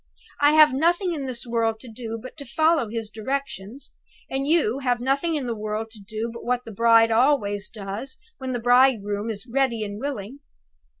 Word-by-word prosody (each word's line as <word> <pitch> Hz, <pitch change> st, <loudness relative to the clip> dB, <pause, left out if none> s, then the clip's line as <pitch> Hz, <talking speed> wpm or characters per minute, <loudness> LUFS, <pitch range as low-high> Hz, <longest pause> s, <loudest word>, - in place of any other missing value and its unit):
I 290 Hz, +1 st, +6 dB
have 305 Hz, -2 st, +7 dB
nothing 345 Hz, +6 st, +2 dB
in 280 Hz, -4 st, -4 dB
the 250 Hz, -2 st, -4 dB
world 225 Hz, -1 st, 0 dB
to 255 Hz, -, -12 dB
do 225 Hz, 0 st, -6 dB
but 255 Hz, +3 st, -10 dB
to 285 Hz, -, -7 dB
follow 310 Hz, 0 st, +2 dB
his 225 Hz, -1 st, -4 dB
directions; 225 Hz, 0 st, -5 dB, 0.4 s
and 270 Hz, +1 st, -1 dB
you 295 Hz, -6 st, +2 dB
have 250 Hz, -3 st, 0 dB
nothing 275 Hz, +6 st, 0 dB
in 285 Hz, -4 st, -2 dB
the 235 Hz, -, -2 dB
world 215 Hz, +1 st, -4 dB
to 220 Hz, -, -12 dB
do 220 Hz, +3 st, -5 dB
but 235 Hz, -, -9 dB
what 250 Hz, 0 st, -1 dB
the 225 Hz, -, -8 dB
bride 230 Hz, +1 st, +5 dB
always 225 Hz, -5 st, +2 dB
does 210 Hz, +5 st, -7 dB, 0.2 s
when 260 Hz, -1 st, -4 dB
the 245 Hz, -, -1 dB
bridegroom 230 Hz, -4 st, +3 dB
is 205 Hz, -1 st, -5 dB
ready 245 Hz, -3 st, 0 dB
and 205 Hz, 0 st, -6 dB
willing!" 265 Hz, -2 st, -5 dB
235 Hz, 190 wpm, -24 LUFS, 220-275 Hz, 0.4 s, have